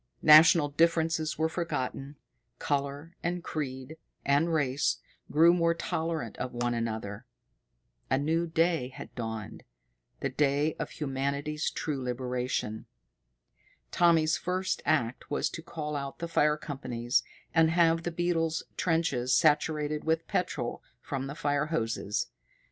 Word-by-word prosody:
National 155 0 +8
differences 160 +1 +1
were 160 - +2
forgotten, 145 -4 -3 0.4
color 145 +3 -2
and 175 0 -2
creed 135 0 -5 0.3
and 145 +4 +3
race 140 -3 +1 0.3
grew 165 +3 +6
more 170 -1 +2
tolerant 160 -8 -3
of 130 - -4
one 120 0 0
another. 110 -3 -4 0.8
A 130 - +3
new 160 +4 0
day 165 -4 +1
had 130 - -10
dawned 110 -3 -6 0.6
the 140 - -1
day 145 +3 +1
of - - -3
humanity's 140 +2 -2
true 145 -4 -3
liberation. 125 -3 -3 1.0
Tommy's 165 -2 +4
first 185 +2 -2
act 125 -5 0
was 145 - 0
to 165 - -6
call 150 -2 -5
out 140 -1 -4
the 170 - -4
fire 150 -2 +2
companies 125 -5 -1 0.3
and 165 -1 +5
have 165 0 +3
the 175 - -2
beetles' 165 -1 0
trenches 160 -8 +1
saturated 150 0 +2
with 160 +1 0
petrol 120 -9 -2 0.2
from 135 +1 -4
the 140 - -6
fire 145 0 0
hoses. 115 -8 -2
150 Hz, 125 wpm, -29 LUFS, 130-165 Hz, 1.0 s, National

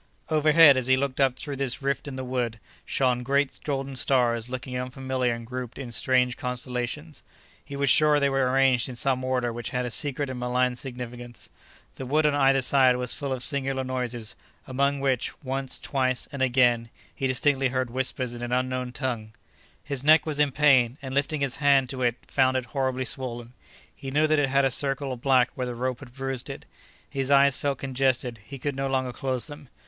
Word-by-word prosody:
Overhead, 155 -2 +6
as 130 -1 0
he 130 0 +4
looked 140 0 -1
up 135 -2 +3
through 140 0 -6
this 135 -1 -1
rift 140 +1 -1
in 140 - -6
the 130 - -5
wood, 125 -3 -2 0.3
shone 125 -2 +1
great 140 +2 0
golden 135 -2 -3
stars 120 -3 +2
looking 130 0 -5
unfamiliar 130 0 -2
and 115 0 -9
grouped 125 0 -6
in 130 -3 -7
strange 125 +1 +1
constellations. 125 +4 -4 0.4
He 140 - -9
was 140 0 0
sure 150 +2 +5
they 140 - +2
were 135 -2 +1
arranged 130 -2 +3
in 125 - -7
some 130 +1 +1
order 125 -2 -1
which 120 0 -5
had 125 0 -2
a 120 - -4
secret 145 +2 0
and 125 - -6
malign 125 0 0
significance. 120 -2 -7 0.5
The 130 - -6
wood 150 +3 +2
on 150 - +3
either 135 -1 +3
side 130 -1 +4
was 125 -1 +1
full 140 -2 -4
of 130 -1 -1
singular 135 -2 0
noises, 125 -3 -3 0.3
among 140 +2 0
which—once, 135 0 -2
twice, 130 -3 -1
and 140 -2 -6
again—he 120 0 +1
distinctly 135 +1 +2
heard 130 -1 -2
whispers 130 -1 -2
in 120 - -8
an 120 0 -4
unknown 125 0 -1
tongue. 120 -5 -3 0.5
His 140 -2 -3
neck 155 +2 +6
was 150 -2 -1
in 145 -2 +3
pain 130 -3 +4
and 130 -1 -5
lifting 145 +2 0
his 135 -2 -1
hand 140 -3 +3
to 130 -1 -5
it 120 -2 +2
found 130 -1 +2
it 130 - -3
horribly 130 -1 -2
swollen. 120 -2 -5 0.4
He 135 - -7
knew 150 +3 +2
that 155 -1 +2
it 140 -2 +1
had 140 +1 +3
a 135 - +2
circle 135 +1 0
of 120 - -9
black 130 -2 +3
where 125 -2 -3
the 120 - -5
rope 125 0 -2
had 130 -4 -12
bruised 135 -2 -4
it. - - -8 0.4
His 135 -1 -3
eyes 140 -1 +5
felt 140 -2 -1
congested; 130 -3 -1
he 140 +6 -9
could 140 +2 -3
no 135 0 -2
longer 130 -2 -1
close 130 -2 -1
them. 145 -3 -11
130 Hz, 200 wpm, -26 LUFS, 125-140 Hz, 0.5 s, Overhead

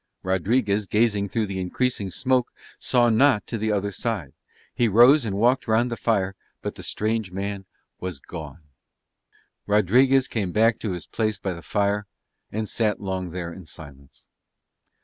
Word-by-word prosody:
Rodriguez 100 +2 +1
gazing 105 -2 +1
through 110 +3 0
the 95 -2 -4
increasing 100 +2 -1
smoke 125 +5 0 0.3
saw 120 -2 +3
not 115 0 +4
to 115 - -4
the 110 +1 0
other 100 0 -1
side. 100 - -3 0.4
He 120 - +2
rose 120 +6 +6
and 100 -3 -2
walked 125 +5 +2
round 115 +2 +2
the - - -1
fire, 100 -5 0 0.3
but - - -3
the - - -10
strange 110 -2 -2
man 100 +1 -4 0.3
was 90 -4 -4
gone. 80 0 -9 1.1
Rodriguez 125 +7 +4
came 100 -6 -2
back 110 +2 +3
to 105 -5 -3
his 90 - -6
place 110 -2 -1
by 95 -2 -3
the 85 - -9
fire 100 +5 0 0.4
and 110 +1 -3
sat 105 -2 0
long 95 -2 -3
there 85 0 -5
in 90 -2 -12
silence. 70 -3 -13
105 Hz, 160 wpm, -24 LUFS, 95-115 Hz, 1.1 s, rose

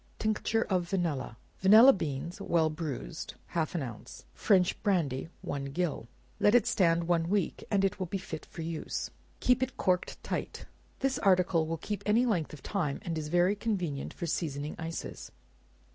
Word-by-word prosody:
Tincture 220 +1 0
of 180 -3 -1
Vanilla. 160 - -1 0.2
Vanilla 220 +8 +8
beans, 160 0 -4
well 160 -2 +2
bruised, 150 - -5
half 165 0 -1
an 160 - 0
ounce; 115 - -9
French 185 - +2
brandy, 165 - 0
one 140 -1 -3
gill; 140 -4 -2 0.3
let 205 +3 +5
it 245 - +5
stand 170 -8 +3
one 170 -1 +1
week, 200 -3 0
and 195 -2 +3
it 195 - -1
will 185 - -2
be 195 - -2
fit 165 -4 -7
for 165 - -7
use. 165 -1 -4 0.3
Keep 250 0 +3
it 260 0 -2
corked 180 -2 0
tight. - - -4 0.4
This 270 -1 +1
article 180 -4 +3
will 165 +1 -2
keep 205 +6 -4
any 225 +4 +4
length 180 -10 0
of 150 - -11
time, 160 -9 -1
and 170 -2 -3
is 155 -1 -3
very 175 +5 +3
convenient 180 -10 -2
for 175 - -5
seasoning 150 -3 -2
ices. 165 +1 -6
175 Hz, 170 wpm, -30 LUFS, 155-200 Hz, 0.4 s, Vanilla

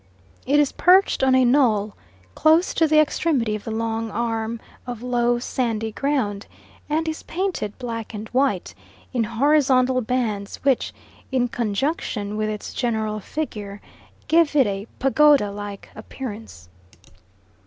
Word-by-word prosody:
It 290 +2 +4
is 290 -2 +3
perched 375 +2 +4
on 260 -1 +4
a 260 -1 +5
knoll, 225 -6 +2 0.4
close 320 +4 +3
to 325 - +3
the 310 0 +3
extremity 285 -7 +1
of 210 - -8
the - - -4
long 225 0 -2
arm 225 0 -2 0.3
of 245 -1 -6
low, 240 -1 +1
sandy 230 -3 -2
ground, 220 -6 -1 0.4
and 320 +2 0
is 315 0 -3
painted 355 - -3
black 230 -3 -5
and 215 0 -7
white, 255 -8 0 0.4
in 240 -3 +1
horizontal 260 +1 +3
bands, 220 -4 -2
which, 270 -3 +2 0.4
in 250 -2 +1
conjunction 220 -2 -2
with 215 0 -1
its 210 -1 -6
general 220 -3 -1
figure, 210 -6 -5 0.5
give 320 -1 +3
it 275 -3 +5
a 200 +1 -3
pagoda 275 -5 +4
like 205 0 -7
appearance. 215 - -8
240 Hz, 135 wpm, -23 LUFS, 215-280 Hz, 0.5 s, a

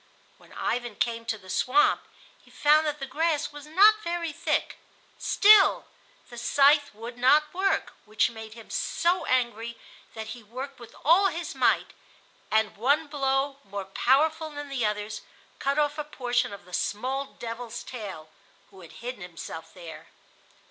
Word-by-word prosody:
When - - -20
Ivan 240 -2 -2
came 230 +1 -1
to 225 -1 -2
the 190 -2 -17
swamp 395 +10 +2 0.4
he - - -21
found 305 +1 +3
that 300 0 -2
the 270 - -4
grass 300 +3 0
was 290 0 -10
not 415 +7 +6
very 340 -3 -3
thick. 325 -1 -1 0.4
Still, 415 -1 +6 0.5
the 240 - -8
scythe 285 +4 +4
would 235 +3 -9
not 300 +4 +4
work, 385 +2 0
which 215 +3 +1
made 220 -1 -10
him 225 -2 -13
so 355 +2 0
angry 235 -2 -1 0.4
that 220 0 -6
he 240 +2 -8
worked 255 +5 -8
with 235 - -13
all 355 +6 +6
his 345 -1 -4
might, - - +2 0.6
and 220 -1 +1
one 280 +8 +2
blow 275 -1 -1
more 200 -1 -6
powerful 305 +10 +2
than 290 -1 -8
the 270 -4 -2
others 210 0 -4 0.4
cut 275 +1 0
off 295 0 +1
a - - -1
portion 245 -4 -1
of 200 - -10
the 180 - -16
small 260 +9 -2
devil's 235 0 -6
tail, 200 -11 -8 0.4
who 190 -1 -15
had 165 -2 -13
hidden 245 -4 -5
himself 165 -2 -8
there. 165 -3 -11
255 Hz, 160 wpm, -27 LUFS, 220-300 Hz, 0.6 s, not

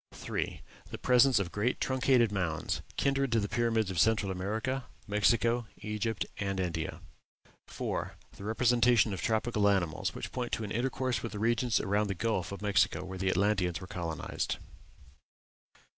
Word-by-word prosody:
3. - - -4 0.3
The - - -6
presence 125 0 +5
of 95 -3 0
great 110 +5 0
truncated 130 -3 +3
mounds, 85 -6 -1 0.2
kindred 135 -1 +1
to 115 - +4
the 100 - -1
pyramids 115 -3 +1
of 90 - -2
Central 110 -3 +3
America, 110 +8 -2 0.2
Mexico, 115 +3 +2
Egypt, 105 0 -2
and 100 -1 -1
India. 85 -3 -3 0.7
4. - - -3 0.2
The - - -10
representation 120 0 +3
of 95 - -4
tropical 110 -2 +2
animals, 85 -6 0
which - - -5
point 125 -2 -4
to 115 - -1
an 105 - -5
intercourse 125 -1 -1
with 115 -2 -5
the - - -4
regions 115 +1 +2
around 105 +1 +1
the 100 - -2
Gulf 100 -4 -1
of 100 +1 -7
Mexico, 100 -2 +2
where 95 0 -7
the 95 0 +1
Atlanteans 95 -2 +1
were 90 - -8
colonized. 85 -4 -3
105 Hz, 160 wpm, -31 LUFS, 95-120 Hz, 0.7 s, presence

